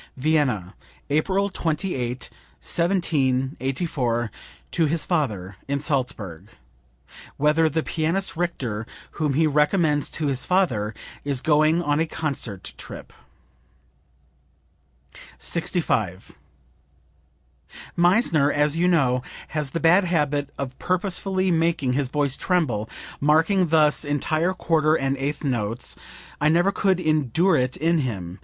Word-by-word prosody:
" -, -, -37 dB
(Vienna, 130 Hz, -, +1 dB, 0.4 s
April 190 Hz, +7 st, +2 dB
28, 155 Hz, -9 st, -2 dB, 0.3 s
1784, 135 Hz, -, 0 dB, 0.4 s
to 165 Hz, -, +2 dB
his 160 Hz, +2 st, -1 dB
father 105 Hz, -, -1 dB
in 140 Hz, 0 st, -1 dB
Salzburg, 125 Hz, -, -3 dB, 0.9 s
whither 155 Hz, +2 st, +3 dB
the 160 Hz, +1 st, -1 dB
pianist 165 Hz, +3 st, -1 dB
Richter, 125 Hz, -11 st, -3 dB, 0.2 s
whom 150 Hz, -4 st, -1 dB
he 160 Hz, +2 st, +3 dB
recommends 150 Hz, 0 st, +2 dB
to 155 Hz, -, -2 dB
his 135 Hz, -3 st, 0 dB
father, 120 Hz, -, +1 dB, 0.3 s
is 140 Hz, -2 st, -1 dB
going 155 Hz, +4 st, +3 dB
on 145 Hz, -1 st, +1 dB
a 165 Hz, -, +1 dB
concert 130 Hz, -, -4 dB
trip.) -, -, -9 dB, 2.2 s
65. 110 Hz, -, -1 dB, 1.6 s
"Meissner, 175 Hz, -5 st, +3 dB
as 150 Hz, +1 st, +2 dB
you 175 Hz, +2 st, +2 dB
know, 135 Hz, -8 st, +3 dB, 0.3 s
has 150 Hz, -3 st, -2 dB
the 165 Hz, -, -3 dB
bad 175 Hz, +4 st, +5 dB
habit 145 Hz, -4 st, 0 dB
of 130 Hz, -1 st, -5 dB
purposely 185 Hz, +1 st, 0 dB
making 165 Hz, -6 st, +1 dB
his 135 Hz, -1 st, 0 dB
voice 140 Hz, -1 st, +1 dB
tremble, 135 Hz, -, 0 dB, 0.3 s
marking 165 Hz, +6 st, +3 dB
thus 155 Hz, -2 st, +3 dB
entire 155 Hz, +5 st, 0 dB
quarter 155 Hz, -3 st, +2 dB
and 135 Hz, -2 st, 0 dB
eighth 145 Hz, +3 st, -3 dB
notes; 120 Hz, -4 st, -1 dB, 0.5 s
I 150 Hz, -, +4 dB
never 175 Hz, +5 st, +3 dB
could 190 Hz, -1 st, +1 dB
endure 155 Hz, +2 st, +2 dB
it 130 Hz, 0 st, 0 dB
in 165 Hz, +1 st, +2 dB
him. 95 Hz, -, -4 dB
150 Hz, 115 wpm, -24 LUFS, 130-170 Hz, 2.2 s, bad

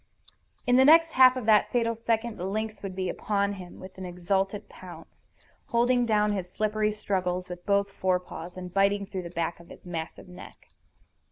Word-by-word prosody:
In 245 Hz, 0 st, +4 dB
the 260 Hz, -, +7 dB
next 325 Hz, +3 st, +6 dB
half 255 Hz, 0 st, +7 dB
of 250 Hz, -, -4 dB
that 215 Hz, -2 st, +4 dB
fatal 230 Hz, -1 st, +1 dB
second 230 Hz, 0 st, -1 dB
the 180 Hz, -, -3 dB
lynx 215 Hz, +1 st, -3 dB
would 195 Hz, -2 st, -6 dB
be 185 Hz, -1 st, -2 dB
upon 200 Hz, +2 st, -1 dB
him 185 Hz, -3 st, -10 dB
with 185 Hz, 0 st, -11 dB
an 185 Hz, -, -6 dB
exultant 195 Hz, +3 st, -2 dB
pounce, -, -, -13 dB, 0.4 s
holding 245 Hz, +1 st, +2 dB
down 210 Hz, -1 st, +2 dB
his 190 Hz, -3 st, -3 dB
slippery 215 Hz, +1 st, 0 dB
struggles 185 Hz, -3 st, -2 dB
with 175 Hz, +1 st, -9 dB
both 200 Hz, 0 st, +2 dB
forepaws, 180 Hz, -2 st, -3 dB
and 180 Hz, -1 st, -7 dB
biting 200 Hz, +1 st, +2 dB
through 190 Hz, -2 st, -5 dB
the 170 Hz, -, -8 dB
back 170 Hz, -1 st, -3 dB
of 170 Hz, -, -16 dB
his -, -, -13 dB
massive 165 Hz, -1 st, -6 dB
neck. 180 Hz, 0 st, -13 dB
200 Hz, 185 wpm, -27 LUFS, 180-220 Hz, 0.4 s, the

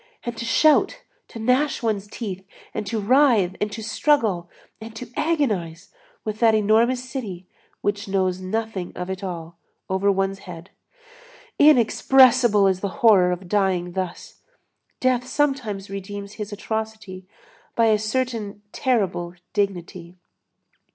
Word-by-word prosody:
And 240 Hz, 0 st, -4 dB
to 235 Hz, -, -4 dB
shout, 300 Hz, +5 st, +3 dB, 0.2 s
to -, -, -11 dB
gnash 255 Hz, +5 st, +1 dB
one's 210 Hz, -3 st, -1 dB
teeth, 200 Hz, -4 st, -6 dB, 0.3 s
and 210 Hz, -, -4 dB
to 220 Hz, +2 st, -2 dB
writhe, 220 Hz, -5 st, +3 dB
and 210 Hz, 0 st, -1 dB
to 220 Hz, +2 st, -6 dB
struggle, 215 Hz, -, +1 dB, 0.3 s
and 220 Hz, 0 st, -9 dB
to 235 Hz, 0 st, -8 dB
agonize, 210 Hz, -, -1 dB, 0.4 s
with 215 Hz, 0 st, -4 dB
that 225 Hz, -2 st, +5 dB
enormous 230 Hz, +4 st, +2 dB
city 210 Hz, -9 st, -6 dB, 0.4 s
which 205 Hz, 0 st, -2 dB
knows 185 Hz, -2 st, 0 dB
nothing 200 Hz, -1 st, -3 dB
of 180 Hz, +1 st, -4 dB
it 190 Hz, +1 st, -6 dB
all, 170 Hz, -2 st, -6 dB, 0.3 s
over 195 Hz, +1 st, +2 dB
one's 195 Hz, 0 st, -1 dB
head! 170 Hz, +2 st, -10 dB, 0.9 s
Inexpressible 250 Hz, -5 st, +5 dB
is 190 Hz, -1 st, +2 dB
the 200 Hz, -, -2 dB, 0.2 s
horror 190 Hz, -5 st, +6 dB
of 180 Hz, +1 st, -5 dB
dying 185 Hz, -3 st, 0 dB
thus! 185 Hz, -1 st, -5 dB, 0.6 s
Death 255 Hz, -1 st, +1 dB
sometimes 255 Hz, -8 st, -1 dB
redeems 200 Hz, +1 st, -6 dB
his 210 Hz, 0 st, -5 dB
atrocity 215 Hz, -3 st, -5 dB, 0.5 s
by 230 Hz, -, +3 dB
a 215 Hz, -1 st, +3 dB
certain 215 Hz, -2 st, -3 dB
terrible 185 Hz, -8 st, -1 dB, 0.2 s
dignity. 180 Hz, -3 st, -3 dB
210 Hz, 130 wpm, -23 LUFS, 190-235 Hz, 0.9 s, horror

